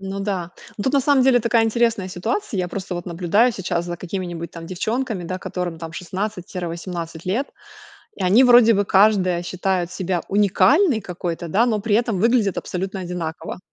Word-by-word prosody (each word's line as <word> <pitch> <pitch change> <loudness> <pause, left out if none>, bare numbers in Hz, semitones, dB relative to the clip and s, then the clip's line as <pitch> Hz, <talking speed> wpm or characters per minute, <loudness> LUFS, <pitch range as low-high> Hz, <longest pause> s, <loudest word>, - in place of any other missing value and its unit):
Ну 195 0 -5
да. 190 -4 -3 0.3
Ну 205 - -3
тут, 265 - 0
на 280 - +5
самом 275 -1 +3
деле, 250 -2 +5
такая 230 0 +2
интересная 225 -4 +1
ситуация. 215 - -3
Я 180 -1 0
просто 185 0 -5
вот 175 - -6
наблюдаю 180 +8 +2
сейчас 175 -3 -2
за 175 0 -4
какими-нибудь 175 -2 -5
там 165 -1 -9
девчонками, 220 +3 -2
да, 185 +2 -4
которым 180 -4 -4
там 165 0 -8
16-18 175 -3 -5
лет, 225 +10 -1 0.7
и - - -5
они 200 +8 +5
вроде 240 -2 +7
бы 200 +1 +1
каждая 190 -3 +3
считает 185 -1 -1
себя 180 -1 -2
уникальной 220 - +3
какой-то, 175 -2 -5
да, 215 +9 +3
но 215 -4 0
при 215 0 0
этом 230 -5 0
выглядят 230 -4 +2
абсолютно 190 +2 -4
одинаково. 175 -2 -5
190 Hz, 175 wpm, -21 LUFS, 175-225 Hz, 0.7 s, вроде